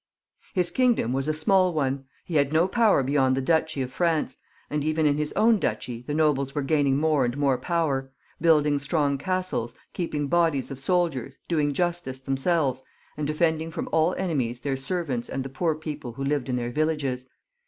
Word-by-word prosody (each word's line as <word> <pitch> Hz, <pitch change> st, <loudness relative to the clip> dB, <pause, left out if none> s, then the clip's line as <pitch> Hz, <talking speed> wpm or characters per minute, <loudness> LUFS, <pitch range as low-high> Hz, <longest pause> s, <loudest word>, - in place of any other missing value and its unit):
53 190 Hz, -, -1 dB
His 180 Hz, -, +1 dB
kingdom 240 Hz, -, +2 dB
was 135 Hz, +2 st, -1 dB
a -, -, +2 dB
small 185 Hz, +3 st, +3 dB
one; 135 Hz, -2 st, -1 dB, 0.2 s
he 165 Hz, -, -1 dB
had 140 Hz, -1 st, +2 dB
no 160 Hz, +3 st, +3 dB
power 215 Hz, -, +3 dB
beyond 130 Hz, -1 st, +2 dB
the -, -, +2 dB
duchy 160 Hz, 0 st, +1 dB
of 130 Hz, -, -6 dB
France, 160 Hz, -6 st, 0 dB, 0.3 s
and 150 Hz, -1 st, -2 dB
even 155 Hz, +1 st, +1 dB
in 145 Hz, 0 st, +2 dB
his 150 Hz, 0 st, -1 dB
own 220 Hz, 0 st, +4 dB
duchy 120 Hz, -7 st, -3 dB
the 145 Hz, +4 st, -4 dB
nobles 145 Hz, -3 st, +1 dB
were 145 Hz, -, 0 dB
gaining 140 Hz, -1 st, +2 dB
more 155 Hz, -2 st, +2 dB
and 120 Hz, +2 st, -1 dB
more 140 Hz, -2 st, +2 dB
power, 140 Hz, -4 st, -1 dB, 0.3 s
building 150 Hz, -3 st, +4 dB
strong 140 Hz, -1 st, 0 dB
castles, 185 Hz, -10 st, -2 dB, 0.2 s
keeping 155 Hz, -4 st, -2 dB
bodies 160 Hz, -3 st, +1 dB
of 135 Hz, -, -6 dB
soldiers, 140 Hz, -5 st, 0 dB
doing 150 Hz, -4 st, +1 dB
justice 170 Hz, -4 st, -2 dB
themselves, 135 Hz, 0 st, 0 dB, 0.3 s
and 150 Hz, -1 st, -2 dB
defeiMiing 160 Hz, +1 st, 0 dB
from -, -, -4 dB
all 160 Hz, +3 st, +2 dB
enemies 130 Hz, -10 st, -2 dB
their 140 Hz, -2 st, -1 dB
servants 135 Hz, -4 st, -3 dB
and 135 Hz, -, -3 dB
the 135 Hz, -, -6 dB
poor 160 Hz, +4 st, 0 dB
people 150 Hz, -5 st, -6 dB
who 135 Hz, +3 st, -5 dB
lived 140 Hz, -1 st, -1 dB
in 125 Hz, -, 0 dB
their 120 Hz, -1 st, -2 dB
villages. 140 Hz, -4 st, -1 dB
150 Hz, 190 wpm, -26 LUFS, 135-165 Hz, 0.3 s, own